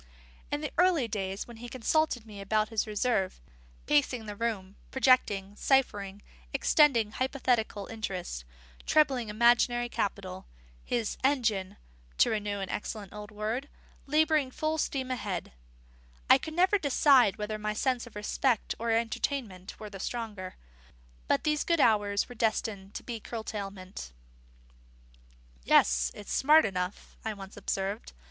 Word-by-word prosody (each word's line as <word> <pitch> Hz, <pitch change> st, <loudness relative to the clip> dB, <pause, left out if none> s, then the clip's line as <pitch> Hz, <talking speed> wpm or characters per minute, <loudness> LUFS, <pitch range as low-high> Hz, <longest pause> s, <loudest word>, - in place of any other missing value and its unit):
In 290 Hz, -, -2 dB
the 300 Hz, -, -3 dB
early 350 Hz, -9 st, +4 dB
days 195 Hz, -2 st, -3 dB
when 235 Hz, -1 st, -11 dB
he 240 Hz, +1 st, -8 dB
consulted 255 Hz, 0 st, 0 dB
me 210 Hz, -2 st, -10 dB
without 215 Hz, +2 st, 0 dB
reserve, 215 Hz, -2 st, 0 dB, 0.5 s
pacing 270 Hz, -6 st, +2 dB
the 210 Hz, -1 st, -6 dB
room, 205 Hz, -4 st, -3 dB
projecting, 210 Hz, -7 st, +2 dB
ciphering, 205 Hz, -7 st, +1 dB, 0.3 s
extending 240 Hz, -9 st, +4 dB
hypothetical 245 Hz, -5 st, 0 dB
interests, 185 Hz, -, -5 dB, 0.4 s
trebling 265 Hz, -7 st, +3 dB
imaginary 240 Hz, +2 st, +3 dB
capital, 190 Hz, -4 st, -3 dB, 0.4 s
his 235 Hz, -3 st, -2 dB
"engine" 220 Hz, -8 st, +1 dB, 0.4 s
(to -, -, +4 dB
renew 205 Hz, -2 st, -2 dB
an 195 Hz, -, -4 dB
excellent 210 Hz, -2 st, -5 dB
old 210 Hz, 0 st, -8 dB
word) 220 Hz, +7 st, -3 dB, 0.4 s
labouring 305 Hz, -1 st, +3 dB
full 310 Hz, +4 st, -2 dB
steam 260 Hz, -3 st, -1 dB
ahead, 200 Hz, -8 st, -3 dB, 0.8 s
I -, -, +8 dB
could 315 Hz, -, -7 dB
never 375 Hz, +3 st, +4 dB
decide 275 Hz, -, +5 dB
whether 215 Hz, 0 st, -3 dB
my 210 Hz, 0 st, -2 dB
sense 250 Hz, +1 st, 0 dB
of 235 Hz, -, -15 dB
respect 220 Hz, +3 st, 0 dB
or 230 Hz, +1 st, -2 dB
entertainment 225 Hz, -3 st, -2 dB
were 215 Hz, -1 st, -8 dB
the 195 Hz, -, -8 dB
stronger. 210 Hz, -5 st, -5 dB, 0.7 s
But -, -, +2 dB
these 300 Hz, -1 st, +1 dB
good 335 Hz, -1 st, +1 dB
hours 205 Hz, -5 st, +3 dB
were 245 Hz, -, -9 dB
destined 215 Hz, -4 st, -1 dB
to 235 Hz, -2 st, -5 dB
curtailment. 200 Hz, -, -6 dB, 1.5 s
"Yes, 60 Hz, 0 st, +4 dB
it's 205 Hz, -, -6 dB
smart 305 Hz, +3 st, +6 dB
enough," 185 Hz, -1 st, -4 dB
I 220 Hz, -1 st, -3 dB
once 195 Hz, -1 st, -10 dB
observed. 195 Hz, +3 st, -3 dB
220 Hz, 130 wpm, -29 LUFS, 200-260 Hz, 1.5 s, I